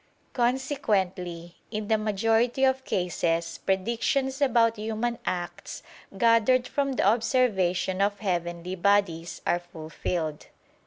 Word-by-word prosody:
Consequently, 200 - -1
in 215 -1 -4
the 220 - +3
majority 225 +4 +1
of 265 0 +3
cases 170 -2 -1
predictions 235 +7 0
about 230 -4 +3
human 225 +2 -2
acts, 175 -1 -4 0.3
gathered 235 +3 +4
from 275 -1 -1
the 255 - 0
observation 195 -5 +2
of 200 0 +1
heavenly 175 -2 -3
bodies, 185 -3 +1
are 175 - +2
fulfilled. 160 -2 -5
205 Hz, 105 wpm, -27 LUFS, 175-240 Hz, 0.3 s, gathered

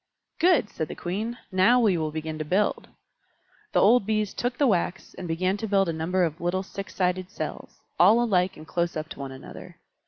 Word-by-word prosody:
"Good!" 330 - +3
said 160 - -3
the - - -7
Queen. 215 +7 -3
"Now 190 +7 +5
we 215 -6 +3
will 160 -2 -1
begin 155 0 -5
to - - -1
build." 190 +7 0 0.8
The - - +3
old 235 +4 +5
Bees 215 -2 0
took 245 +1 -2
the 290 - +3
wax, 190 -5 0
and 180 - -7
began 185 +4 0
to 220 - -4
build 195 -2 +2
a 165 - -1
number 175 +4 0
of 165 -1 -2
little 180 +2 0
six 195 +1 -8
sided 185 0 0
cells, 205 - -7 0.2
all 205 +7 +7
alike 190 -6 +1
and 155 - -11
close 170 -1 -1
up 155 0 -5
to - - -9
one 135 -1 -5
another. 130 - -11
185 Hz, 210 wpm, -26 LUFS, 165-210 Hz, 0.8 s, all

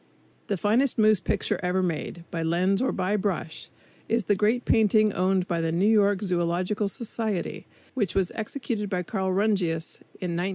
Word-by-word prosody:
The 200 - -1
finest 230 +8 +2
moose 215 -2 +5
picture - - -1
ever 180 +1 0
made, 170 0 -3
by 165 - -3
lens 180 +5 +1
or 260 - +1
by 190 +2 0
brush, 190 -5 -3 0.4
is 230 0 +1
the 205 - +2
great 215 +5 +1
painting 215 -1 +4
owned 185 0 +1
by 170 -2 -1
the 165 0 0
New 175 +4 +1
York 205 -2 +3
Zoological 180 +3 0
Society, 215 -2 -4 0.3
which 210 -9 -1
was 190 -2 +1
executed 220 -2 -4
by 180 -2 -1
Carl 190 +1 -2
Rungius 185 -5 0 0.2
in 180 -2 -4
1915. 175 +3 -1
195 Hz, 170 wpm, -26 LUFS, 180-215 Hz, 0.4 s, moose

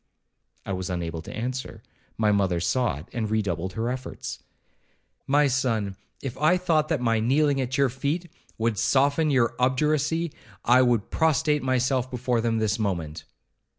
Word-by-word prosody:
I 100 - -3
was 95 0 -3
unable 85 -2 -3
to - - -9
answer, 130 +3 -4 0.3
my 110 -1 +3
mother 95 -4 +1
saw 90 - 0
it, 75 - -10
and 110 -3 -2
redoubled 95 -4 -1
her 110 +3 -2
efforts. 130 0 -6 0.9
'My 145 +2 +4
son, 115 -7 0 0.3
if 135 -4 -4
I 155 +5 +4
thought 160 -4 +1
that 155 -6 0
my 115 -2 +2
kneeling 140 +4 +2
at 130 0 -2
your 140 -1 +3
feet 145 +8 -2 0.3
would 110 -2 0
soften 140 +3 +3
your 125 -5 +2
obduracy, 150 +5 +1 0.3
I 125 +2 +6
would 120 -4 +1
prostrate 150 -2 +2
myself 130 0 +1
before 125 -1 -1
them 115 -1 0
this 110 0 0
moment.' 85 -7 -3
125 Hz, 155 wpm, -25 LUFS, 105-140 Hz, 0.9 s, I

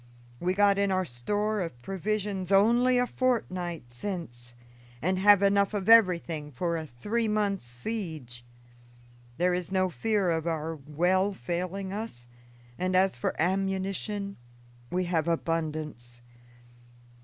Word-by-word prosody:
We 180 +1 0
got 200 0 +4
in 200 0 +2
our 185 -1 +1
store 205 - -1
of 165 -9 -5
provisions 195 0 -2
only 240 +6 +5
a 245 - +3
fortnight 180 - -2
since, 120 -5 -6 0.4
and 185 +5 0
have 200 0 +6
enough 200 +1 +3
of 195 -2 -2
everything 175 -9 +4
for 170 +6 -1
a 160 -1 -4
three 210 - -2
months' 205 - 0
siege. 125 - -5 0.9
There 180 +2 +2
is 180 0 -3
no 185 -1 +1
fear 205 -1 +1
of 165 0 -1
our 160 0 -2
well 175 +7 +1
failing 185 +6 -3
us; 200 - -6 0.5
and 185 +1 0
as 190 -3 +3
for 120 - -3
ammunition, 195 +2 -1 0.5
we 185 +1 0
have 170 -2 0
abundance. 155 -7 -3
185 Hz, 130 wpm, -28 LUFS, 160-200 Hz, 0.9 s, have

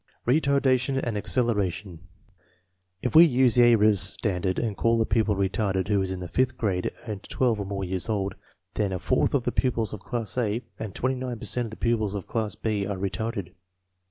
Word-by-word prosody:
Retardation 135 -1 +2
and 115 -3 -2
acceleration. 100 -5 0 1.0
If 125 - -1
we 165 - +11
use 130 -6 +4
the 125 - +5
Ayres 110 -4 +5
standard 95 -1 -1
and 110 -4 -1
call 115 +2 +2
a 110 - +2
pupil 110 -3 +1
retarded 95 0 -1
who 100 -2 +2
is 95 - -2
in 95 -1 -4
the 90 - -5
fifth 130 +9 0
grade 95 -5 -1 0.2
and 105 -3 -5
12 120 -2 0
or 100 - -3
more 100 -1 -3
years 95 +2 -3
old, 100 -2 -1 0.4
then 100 -3 -1
a - - -1
fourth 90 +9 +1
of 130 - +1
the 125 - -1
pupils 115 -3 0
of 105 - -6
class 115 +1 -3
A 115 +1 -1 0.2
and 110 -4 -6
29 130 -1 -2
per - - -8
cent 125 -1 0
of - - -9
the 110 - -10
pupils 110 -4 0
of 100 - -4
class 110 -2 -2
B 105 -3 -2
are 100 -1 -3
retarded. 100 0 -3
110 Hz, 200 wpm, -26 LUFS, 95-120 Hz, 1.0 s, we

